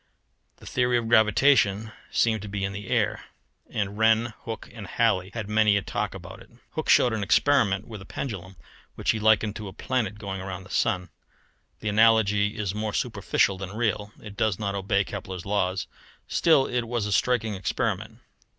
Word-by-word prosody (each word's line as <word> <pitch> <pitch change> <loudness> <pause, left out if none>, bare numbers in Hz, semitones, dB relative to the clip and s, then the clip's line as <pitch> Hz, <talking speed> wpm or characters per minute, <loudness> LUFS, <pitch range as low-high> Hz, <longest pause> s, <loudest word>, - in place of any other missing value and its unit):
The - - -16
theory 125 -1 +1
of 115 -1 -2
gravitation 110 -1 +4 0.2
seemed 110 -3 +1
to 105 - -7
be 100 -1 -4
in 95 0 -2
the 100 0 -7
air, - - 0 0.5
and 105 0 -3
Wren, 110 +1 +3
Hooke, 115 -1 -6
and 110 -5 -8
Halley 95 -5 +1
had 115 -3 -4
many 105 -1 +3
a 100 - -2
talk - - -3
about - - -10
it. - - -16 0.2
Hooke - - -4
showed 120 - +5
an 110 - -2
experiment 105 -3 +2
with 110 -4 -8
a - - -10
pendulum, 95 -6 -6 0.4
which - - +1
he 110 - -3
likened 110 -1 +3
to 105 - -7
a 95 - -8
planet 110 -5 -2
going 95 -2 -5
round 95 -1 -6
the 95 - -13
sun. 90 -1 0 0.7
The 110 - -1
analogy 105 -1 +3
is 100 -3 -2
more 105 0 -3
superficial 95 -1 0
than 95 +1 -6
real. 105 -2 -1
It 105 -1 -10
does 105 -2 +1
not 100 -2 -2
obey 100 0 +1
Kepler's 95 -2 -7
laws; 95 -3 0 0.4
still 155 -5 +4
it 120 -2 -2
was 120 -2 -1
a 105 - -3
striking 110 +1 +1
experiment. 95 -3 -3
105 Hz, 185 wpm, -26 LUFS, 100-110 Hz, 0.7 s, showed